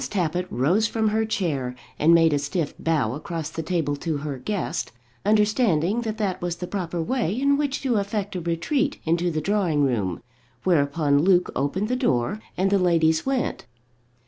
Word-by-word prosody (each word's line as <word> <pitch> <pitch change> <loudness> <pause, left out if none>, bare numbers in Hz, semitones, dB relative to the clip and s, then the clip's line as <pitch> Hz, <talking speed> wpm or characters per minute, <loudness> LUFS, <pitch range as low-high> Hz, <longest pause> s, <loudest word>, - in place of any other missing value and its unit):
Tappitt 180 -2 -1
rose 175 - +2
from 220 0 0
her 220 +1 +1
chair, 145 - -2 0.2
and 160 +3 +5
made 165 -2 +5
a 145 - +2
stiff 145 +2 -2
bow 150 -9 +1
across 155 +2 -5
the 165 - -4
table 160 -4 -1
to 160 0 -2
her 145 -2 -5
guest, 205 +7 -3 0.3
understanding 210 -2 +2
that 220 -2 -3
that 200 -4 -2
was 175 -1 -2
the 180 - -5
proper 175 -3 -3
way 225 +3 -1
in 280 +1 +3
which 285 -1 -1
to 250 -5 +1
effect 200 -1 -2
a 180 - -2
retreat 260 - -1
into 170 +2 +1
the 155 -2 -2
drawing 180 -5 +1
room; 105 -10 -1 0.4
whereupon 145 -4 +2
Luke 180 +2 +3
opened 160 +10 -1
the 250 - 0
door, 205 - 0 0.2
and 195 +1 +1
the 200 - +4
ladies 165 0 +2
went. 270 - -1
175 Hz, 175 wpm, -24 LUFS, 155-210 Hz, 0.4 s, and